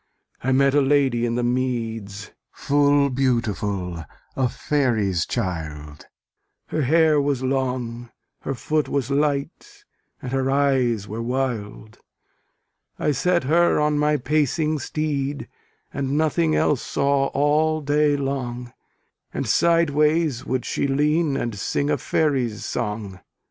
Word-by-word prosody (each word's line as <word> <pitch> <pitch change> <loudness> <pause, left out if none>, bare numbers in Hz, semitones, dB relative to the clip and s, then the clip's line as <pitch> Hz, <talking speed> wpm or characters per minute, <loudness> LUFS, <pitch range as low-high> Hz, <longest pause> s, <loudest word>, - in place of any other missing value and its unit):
I 130 - +1
met 135 +1 +3
a 145 - +4
lady 135 -4 +2
in 115 - -2
the 120 - -1
meads 115 -5 -2 0.2
Full 145 -1 +2
beautiful, 105 -9 -1 0.3
a 130 -2 +1
faery's 110 - 0
child; 75 -8 -5 0.6
Her 155 - -1
hair 155 +2 +4
was 140 -2 -1
long, 125 -3 -2 0.3
her 135 - -4
foot 150 +5 -1
was 140 -1 -1
light, 140 0 -2 0.3
And 125 - -6
her 135 0 0
eyes 130 -6 +1
were 110 +3 -5
wild. 115 -4 -4 1.0
I 150 - +1
set 170 +5 +1
her 170 +5 +3
on 150 0 +1
my 150 0 +2
pacing 150 +2 0
steed, 145 0 -3 0.5
And 140 +1 -1
nothing 160 +1 +1
else 145 -4 +2
saw 140 0 +1
all 155 +3 +1
day 145 0 +2
long; 125 -3 -4 0.6
And - - -3
sideways 155 -4 +2
would 130 -1 -1
she - - -1
lean, 150 +1 +1
and 120 -4 -2
sing 140 +8 -1
A - - +2
faery's 130 -9 0
song. 105 -4 -4
135 Hz, 125 wpm, -23 LUFS, 120-145 Hz, 1.0 s, a